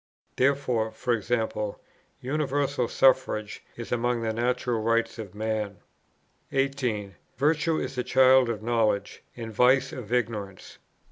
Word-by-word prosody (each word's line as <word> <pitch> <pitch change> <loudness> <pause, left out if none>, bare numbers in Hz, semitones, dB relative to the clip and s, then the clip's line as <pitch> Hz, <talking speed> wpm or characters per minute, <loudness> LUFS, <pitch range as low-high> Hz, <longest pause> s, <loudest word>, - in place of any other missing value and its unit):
Therefore, 125 -5 +1 0.2
e.g. 120 +2 0 0.8
Universal 140 -2 0
Suffrage 115 -6 +2
is 115 - -7
among 120 0 0
the 110 -1 -1
natural 120 0 0
rights 115 +1 0
of 105 -3 -8
man. 110 -2 -2 0.7
18. 130 -7 -1 0.2
Virtue 155 +3 +2
is - - -3
the 125 -1 -2
child 130 -1 +5
of 110 -2 -3
knowledge, 110 -4 0 0.2
and 115 -2 -6
vice 130 +3 +3
of 120 -4 -8
ignorance. 105 -6 -3
120 Hz, 120 wpm, -27 LUFS, 110-130 Hz, 0.8 s, child